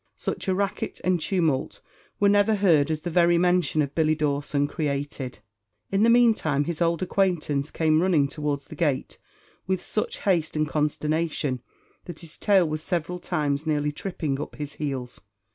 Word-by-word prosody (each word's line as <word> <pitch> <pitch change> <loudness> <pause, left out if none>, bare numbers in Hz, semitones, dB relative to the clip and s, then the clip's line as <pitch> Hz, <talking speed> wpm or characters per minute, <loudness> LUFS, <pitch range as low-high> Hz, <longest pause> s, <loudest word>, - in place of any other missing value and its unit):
Such - - -4
a 190 - +2
racket 200 0 -2
and 180 -2 +1
tumult 160 -7 0 0.4
were 205 - +4
never 205 +2 +4
heard 165 -8 +3
as 155 -1 -1
the 175 - -4
very 170 0 +4
mention 175 -4 +2
of 140 0 -5
Billy 155 -1 +2
Dawson 145 -1 0
created. 140 -3 -3 0.5
In 195 +1 +2
the 230 - +5
meantime, 225 - +4
his 170 +2 -4
old 170 0 +1
acquaintance 170 -7 0
came 160 -1 +2
running 170 -6 +3
towards 145 -1 -3
the - - -10
gate 145 -6 -1 0.5
with 190 -1 -1
such 215 - -2
haste 175 -6 +1
and 155 0 +1
consternation, 150 -2 -1 0.4
that 175 -3 -8
his 165 -2 -7
tail 195 -5 +3
was 155 0 -3
several 175 +1 -2
times 150 -4 -1
nearly 150 -1 +1
tripping 150 -4 -3
up - - -7
his 145 -1 -6
heels. 135 -4 -5
155 Hz, 165 wpm, -25 LUFS, 145-180 Hz, 0.5 s, the